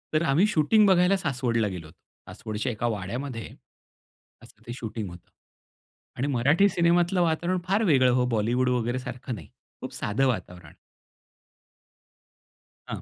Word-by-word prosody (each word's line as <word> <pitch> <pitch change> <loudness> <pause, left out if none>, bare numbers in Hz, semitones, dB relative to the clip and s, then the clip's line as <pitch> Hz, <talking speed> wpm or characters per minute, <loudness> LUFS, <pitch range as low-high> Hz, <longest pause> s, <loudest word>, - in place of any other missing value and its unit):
तर 155 - +2
आम्ही 165 +9 +4
शूटिंग 210 +4 +3
बघायला 185 +1 +4
सासवडला 125 - -1
गेलो 90 -5 -6
होतो. 80 - -19 0.3
सासवडच्या 110 +4 -4
एका 120 +1 -2
वाड्यामध्ये 115 +3 -4 1.0
असं - - -18
ते 120 - -5
शूटिंग 110 -4 -5
होतं. 85 0 -14 0.9
आणि 135 - -1
मराठी 145 +9 +3
सिनेमातलं 175 +1 +2
वातावरण 170 +2 0
फार 200 +4 +2
वेगळं 135 - +4
हो, 125 0 +2
बॉलिवूड 120 +4 +1
वगैरे 120 0 0
सारखं 125 0 -6
नाही. 85 -8 -11 0.3
खूप - - -7
साधं 135 +6 0
वातावरण. 90 -9 -4 2.1
हां. - - -5
125 Hz, 135 wpm, -26 LUFS, 110-170 Hz, 2.1 s, आम्ही